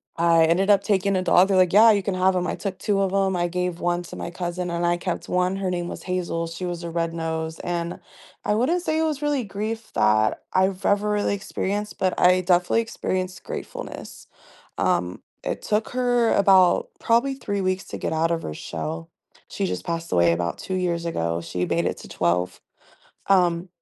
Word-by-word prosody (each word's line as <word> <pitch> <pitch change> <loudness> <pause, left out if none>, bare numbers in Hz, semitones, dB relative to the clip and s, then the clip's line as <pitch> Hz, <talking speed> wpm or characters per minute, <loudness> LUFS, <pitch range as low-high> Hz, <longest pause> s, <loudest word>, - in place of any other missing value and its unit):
I 165 -1 +4
ended 180 +5 +2
up 200 -1 +6
taking 200 -1 +1
a - - +1
dog, 180 +1 +4
they're 195 - +3
like, 185 -1 +4
"Yeah, 220 +3 +8
you 205 -2 +2
can 195 +1 -2
have 185 +1 +2
‘em." 180 0 -1
I - - -2
took 195 -3 -5
2 200 -2 +1
of 195 -1 +1
‘em, 195 -1 +2
I 175 0 +1
gave 180 0 -2
1 175 0 0
to 175 - -10
my 170 - -5
cousin, 175 0 -4
and 170 0 -1
I 175 0 +3
kept 175 0 -4
1. 180 +1 +1
Her 195 -1 -2
name 175 -1 -2
was - - -7
Hazel, 175 -2 -2
she 170 +2 -6
was 175 -1 -4
a - - -4
red 165 0 -2
nose. 160 -1 -3
And 175 0 -3 0.5
I 210 - +2
wouldn't 315 +11 +1
say 315 -2 0
it - - +2
was 305 -3 -1
really 295 -3 0
grief 215 +2 -5
that 110 0 +2
I've 190 +1 +1
ever 205 +1 +2
really 205 -1 +1
experienced, 205 +1 -3
but 185 -1 0
I 180 +1 +5
definitely 180 +3 +2
experienced 185 -4 -3
gratefulness. - - -8 0.5
Um, 90 +1 0 0.2
it - - -3
took 215 +1 0
her 245 -2 +2
about 190 -2 +5
probably 235 +4 +2
3 205 -6 -3
weeks 185 0 -1
to - - -5
get - - -3
out 165 +1 +1
of 165 -1 0
her 75 - -4
shell. 80 +1 -5 0.4
She - - -2
just 90 0 -4
passed 165 0 -3
away 85 -1 +4
about 85 0 -2
2 190 - -4
years 175 -2 -1
ago, 85 - -1
she 90 +1 -3
made - - 0
it - - -1
to - - -11
12. 90 +1 -1 0.7
Um, 180 -2 +3
180 Hz, 210 wpm, -24 LUFS, 170-200 Hz, 0.7 s, Yeah